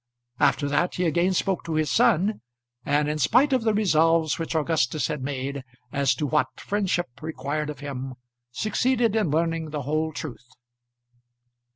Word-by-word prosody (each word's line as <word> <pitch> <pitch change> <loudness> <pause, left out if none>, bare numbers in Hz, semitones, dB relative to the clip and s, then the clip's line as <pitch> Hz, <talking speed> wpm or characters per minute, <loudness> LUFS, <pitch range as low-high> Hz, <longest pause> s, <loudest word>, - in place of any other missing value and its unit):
After 145 - +3
that 150 +5 0
he 180 - 0
again 170 +3 +2
spoke 190 0 0
to 165 -1 -2
his 155 -1 +1
son, 215 -3 +3 0.4
and 145 +2 +1
in 150 +1 -2
spite 255 - +4
of 255 - +3
the 225 -1 +2
resolves 165 -6 +3
which 165 0 -3
Augustus 155 -2 +1
had 150 -3 -3
made 135 0 -4 0.3
as 140 -2 +2
to 150 - -2
what 130 -1 0
friendship 180 -10 -2
required 150 -1 -3
of 145 -2 -7
him, 135 -2 -5 0.3
succeeded 230 - +1
in 215 -7 +1
learning 165 +1 0
the 150 -2 -4
whole 155 +3 -1
truth. 140 -5 -7
155 Hz, 160 wpm, -25 LUFS, 145-180 Hz, 0.4 s, spite